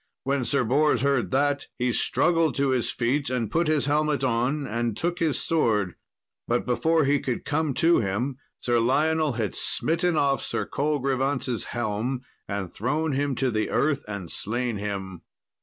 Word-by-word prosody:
When 135 Hz, -2 st, 0 dB
Sir 140 Hz, +2 st, +1 dB
Bors 135 Hz, +1 st, +2 dB
heard 135 Hz, -9 st, +2 dB
that, 145 Hz, +4 st, +1 dB
he 125 Hz, 0 st, +1 dB
struggled 165 Hz, +5 st, +2 dB
to 140 Hz, 0 st, +1 dB
his 130 Hz, -2 st, +1 dB
feet, 130 Hz, +4 st, 0 dB
and 120 Hz, -5 st, -2 dB
put 165 Hz, +3 st, +1 dB
his 155 Hz, -3 st, +2 dB
helmet 150 Hz, 0 st, +1 dB
on, 130 Hz, +4 st, 0 dB
and 115 Hz, -2 st, -2 dB
took 175 Hz, +1 st, -1 dB
his 160 Hz, -6 st, +1 dB
sword. 110 Hz, -, +1 dB, 0.5 s
But 120 Hz, +1 st, 0 dB
before 160 Hz, +5 st, +2 dB
he 145 Hz, +1 st, +3 dB
could 125 Hz, -3 st, -3 dB
come 150 Hz, -2 st, 0 dB
to 170 Hz, +1 st, +4 dB
him, 115 Hz, +6 st, -1 dB, 0.2 s
Sir 120 Hz, -1 st, +2 dB
Lionel 155 Hz, +5 st, +2 dB
had 110 Hz, -5 st, -2 dB
smitten 170 Hz, +1 st, 0 dB
off 140 Hz, -2 st, +2 dB
Sir -, -, -2 dB
Colgrevance's 135 Hz, -3 st, -1 dB
helm, 120 Hz, +2 st, -2 dB, 0.3 s
and 100 Hz, -3 st, -4 dB
thrown 150 Hz, +8 st, -1 dB
him 140 Hz, 0 st, 0 dB
to 130 Hz, 0 st, 0 dB
the 110 Hz, -1 st, -1 dB
earth 145 Hz, -2 st, +1 dB
and 100 Hz, -5 st, -6 dB
slain 120 Hz, +1 st, -2 dB
him. 100 Hz, -3 st, -5 dB
135 Hz, 165 wpm, -26 LUFS, 115-150 Hz, 0.5 s, to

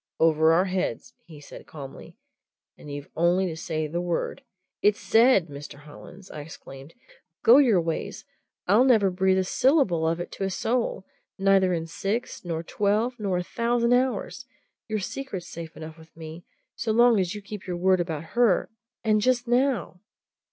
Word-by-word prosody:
"Over 160 Hz, 0 st, +4 dB
our 175 Hz, +3 st, +3 dB
heads," 185 Hz, -10 st, -3 dB
he 155 Hz, -3 st, -12 dB
said 145 Hz, -, -12 dB
calmly. 140 Hz, -3 st, -11 dB, 0.6 s
"And 150 Hz, -, -11 dB
you've 145 Hz, 0 st, -8 dB
only 175 Hz, +3 st, +2 dB
to 170 Hz, -3 st, -4 dB
say 160 Hz, -1 st, -3 dB
the 170 Hz, +3 st, -3 dB
word 175 Hz, +9 st, -3 dB, 0.2 s
" 185 Hz, -, -56 dB
"It's 210 Hz, 0 st, +3 dB
said, 225 Hz, -5 st, +4 dB
Mr. 145 Hz, -1 st, -10 dB
Hollins!" 175 Hz, +6 st, -13 dB
I 150 Hz, -, -7 dB
exclaimed. 145 Hz, -1 st, -12 dB, 0.5 s
"Go 245 Hz, +5 st, +8 dB
your 235 Hz, -10 st, +4 dB
ways! 165 Hz, -1 st, -4 dB, 0.4 s
I'll 210 Hz, +7 st, +5 dB
never 220 Hz, -7 st, +4 dB
breathe 190 Hz, +1 st, +2 dB
a 190 Hz, -, +2 dB
syllable 190 Hz, -, +2 dB
of 165 Hz, +1 st, 0 dB
it 175 Hz, -, -6 dB
to -, -, -5 dB
a 195 Hz, -, 0 dB
soul! 230 Hz, 0 st, -2 dB, 0.3 s
Neither 195 Hz, -1 st, +3 dB
in 165 Hz, -1 st, -3 dB
six, 200 Hz, +8 st, -4 dB
nor 165 Hz, -2 st, -4 dB
twelve, 215 Hz, +7 st, 0 dB
nor 195 Hz, -4 st, -1 dB
a 180 Hz, -, -2 dB
thousand 235 Hz, +4 st, 0 dB
hours! 255 Hz, +1 st, -1 dB, 0.4 s
your 215 Hz, -1 st, -2 dB
secret's 205 Hz, -2 st, -5 dB
safe 165 Hz, -1 st, -9 dB
enough 160 Hz, 0 st, -9 dB
with 160 Hz, 0 st, -18 dB
me 160 Hz, +1 st, -9 dB, 0.3 s
so 225 Hz, -, -2 dB
long 235 Hz, -1 st, +5 dB
as 185 Hz, +1 st, -1 dB
you 210 Hz, -, -7 dB
keep 205 Hz, -1 st, -9 dB
your 180 Hz, -1 st, -3 dB
word 185 Hz, +1 st, +3 dB
about 165 Hz, -3 st, -3 dB
her 235 Hz, -6 st, +2 dB, 0.3 s
and 215 Hz, -1 st, +2 dB
just 250 Hz, +1 st, +1 dB
now!" 245 Hz, -6 st, 0 dB
185 Hz, 175 wpm, -25 LUFS, 165-225 Hz, 0.6 s, Go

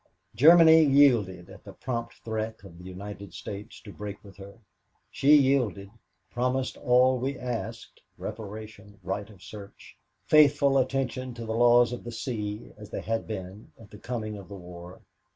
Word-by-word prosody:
Germany 160 Hz, +5 st, +7 dB
yielded 120 Hz, -, +3 dB
at 95 Hz, -, -14 dB
the 100 Hz, -, -11 dB
prompt 115 Hz, +2 st, -5 dB
threat 110 Hz, -1 st, -4 dB
of 85 Hz, -3 st, -13 dB
the -, -, -12 dB
United 100 Hz, 0 st, -9 dB
States 100 Hz, +5 st, -8 dB
to 100 Hz, -, -12 dB
break 105 Hz, 0 st, -8 dB
with 100 Hz, -1 st, -14 dB
her. 100 Hz, +2 st, -12 dB, 0.5 s
She 145 Hz, +2 st, +5 dB
yielded, 130 Hz, -8 st, +1 dB, 0.4 s
promised 125 Hz, +3 st, -1 dB
all 125 Hz, +1 st, +3 dB
we 135 Hz, +2 st, -3 dB
asked 115 Hz, -2 st, -6 dB, 0.2 s
reparation, 105 Hz, -1 st, -9 dB
right 100 Hz, +3 st, -4 dB
of 100 Hz, -4 st, -16 dB
search, 100 Hz, -2 st, -12 dB, 0.3 s
faithful 145 Hz, -2 st, +5 dB
attention 130 Hz, -1 st, -2 dB
to 115 Hz, -1 st, -7 dB
the 110 Hz, -, -3 dB
laws 120 Hz, +1 st, +4 dB
of 120 Hz, -, -7 dB
the 120 Hz, -, -7 dB
sea 110 Hz, -3 st, -5 dB
as 105 Hz, -1 st, -11 dB
they -, -, -5 dB
had 115 Hz, 0 st, -3 dB
been 100 Hz, -1 st, -8 dB
at 110 Hz, -, -16 dB
the 105 Hz, -, -12 dB
coming 110 Hz, -4 st, -5 dB
of 95 Hz, -2 st, -12 dB
war. 90 Hz, -2 st, -11 dB
110 Hz, 160 wpm, -27 LUFS, 100-125 Hz, 0.5 s, Germany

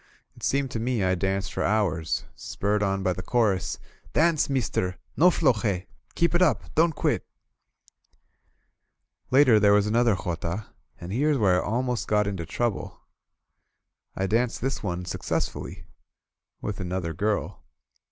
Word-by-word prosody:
It -, -, -17 dB
seemed 135 Hz, -1 st, 0 dB
to 115 Hz, -, -3 dB
me 120 Hz, -2 st, 0 dB
I 95 Hz, 0 st, +2 dB
danced 95 Hz, +1 st, -1 dB
for -, -, -2 dB
hours, 95 Hz, -7 st, 0 dB
spurred 105 Hz, +1 st, -2 dB
on 95 Hz, -1 st, 0 dB
by 95 Hz, -2 st, +1 dB
the 90 Hz, -, -6 dB
chorus: 105 Hz, -2 st, +1 dB, 0.3 s
^*Dance, 160 Hz, -2 st, +2 dB
meester! 105 Hz, -8 st, -1 dB, 0.2 s
No 175 Hz, +4 st, +6 dB
floje! 110 Hz, -, +1 dB, 0.3 s
Keep 170 Hz, 0 st, +2 dB
it 175 Hz, -, +2 dB
up! 180 Hz, -, +1 dB
Don't 160 Hz, 0 st, +3 dB
quit -, -, 0 dB, 1.5 s
!" -, -, -51 dB
Later 125 Hz, -7 st, +6 dB
there 100 Hz, 0 st, +5 dB
was 105 Hz, 0 st, +4 dB
another 115 Hz, 0 st, +3 dB
jota^ 85 Hz, +2 st, -3 dB, 0.3 s
and 85 Hz, +1 st, -7 dB
here's 145 Hz, +4 st, +2 dB
where 95 Hz, -6 st, +3 dB
I -, -, -5 dB
al 120 Hz, +4 st, 0 dB
most 125 Hz, -2 st, -2 dB
got 105 Hz, 0 st, +2 dB
into 95 Hz, -5 st, -4 dB
trouble. 115 Hz, +5 st, -2 dB, 1.2 s
I 95 Hz, -, -1 dB
danced 115 Hz, +4 st, 0 dB
this 135 Hz, +2 st, -2 dB
one 90 Hz, -3 st, -3 dB
successfully 90 Hz, 0 st, -3 dB, 0.4 s
— -, -, -40 dB
^with 105 Hz, -, -3 dB
another 90 Hz, -2 st, -3 dB
girl. 105 Hz, +5 st, -2 dB
105 Hz, 150 wpm, -26 LUFS, 95-125 Hz, 1.5 s, No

